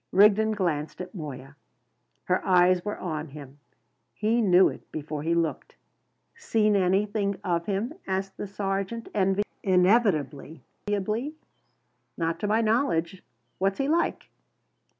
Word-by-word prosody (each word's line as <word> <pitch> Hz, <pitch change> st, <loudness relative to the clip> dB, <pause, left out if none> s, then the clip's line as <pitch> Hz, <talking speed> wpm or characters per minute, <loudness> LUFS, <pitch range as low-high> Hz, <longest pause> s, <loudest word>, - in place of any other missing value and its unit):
Rigden 210 Hz, +2 st, +5 dB
glanced 160 Hz, -6 st, -2 dB
at 180 Hz, +3 st, -7 dB
Moya. 140 Hz, -6 st, -8 dB, 0.7 s
Her 185 Hz, 0 st, 0 dB
eyes 180 Hz, -1 st, +4 dB
were 210 Hz, -, -3 dB
on 155 Hz, -3 st, -4 dB
him. 140 Hz, -1 st, -11 dB, 0.6 s
He 225 Hz, +3 st, +1 dB
knew 185 Hz, -3 st, +6 dB
it -, -, -8 dB
before 150 Hz, -1 st, -5 dB
he 165 Hz, +2 st, 0 dB
looked. 165 Hz, -2 st, -2 dB, 0.6 s
"Seen 220 Hz, -, +1 dB
anything 200 Hz, +1 st, +1 dB
of 170 Hz, -1 st, -1 dB
him?" 210 Hz, +7 st, -1 dB
asked 190 Hz, 0 st, -2 dB
the -, -, -5 dB
sergeant 195 Hz, +3 st, -3 dB, 0.5 s
inevitably. 180 Hz, -, +2 dB, 1.5 s
"Not 165 Hz, -1 st, -1 dB
to 210 Hz, -, -2 dB
my 220 Hz, +2 st, +2 dB
knowledge. 200 Hz, -6 st, 0 dB, 0.4 s
What's 195 Hz, +1 st, +1 dB
he 275 Hz, -, 0 dB
like?" 335 Hz, +3 st, 0 dB
190 Hz, 120 wpm, -26 LUFS, 165-210 Hz, 1.5 s, knew